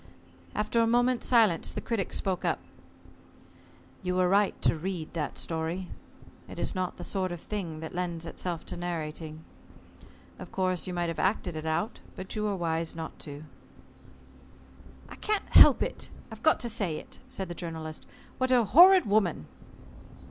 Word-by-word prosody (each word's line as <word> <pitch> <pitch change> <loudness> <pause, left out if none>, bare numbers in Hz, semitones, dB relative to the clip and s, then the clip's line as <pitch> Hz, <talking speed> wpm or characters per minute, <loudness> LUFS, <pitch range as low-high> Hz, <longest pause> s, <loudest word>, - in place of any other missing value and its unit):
After 215 +2 +1
a 230 - +3
moment's 245 +1 +2
silence 220 -9 +4
the - - -4
Critic 220 -6 -2
spoke 185 -2 -1
up. - - +1 1.4
"You 180 -1 -1
were 185 0 +3
right 200 +2 +2
to - - +4
read 170 0 -4
that 155 -4 -3
story. 165 +3 -3 0.6
It - - -9
is - - -1
not 185 -2 -2
the 175 - -8
sort 185 -1 -2
of 175 - -5
thing 170 -6 -5
that 160 - -6
lends 175 -2 -3
itself 170 0 -4
to - - -6
narrating. 160 -2 -5 1.0
Of - - -9
course 185 -2 0
you 180 - -3
might 175 -1 0
have 165 - -4
acted 190 -3 0
it 155 0 -4
out, 160 +8 -1 0.2
but 190 +3 -7
you 215 0 -1
were 205 -1 0
wise 165 -2 -2
not 160 -1 -7
to." 145 0 -8 1.6
"I - - -10
can't 425 -1 -1
help - - +8
it - - -5 0.3
got 315 - +4
to 240 - 0
say 200 -8 -1
it," - - -10
said 190 - -5
the 175 - -5
Journalist: 160 -2 -7 0.3
"What 260 0 +1
a 245 -2 +5
horrid 365 - +8
woman!" 200 - +1
180 Hz, 165 wpm, -29 LUFS, 165-210 Hz, 1.6 s, help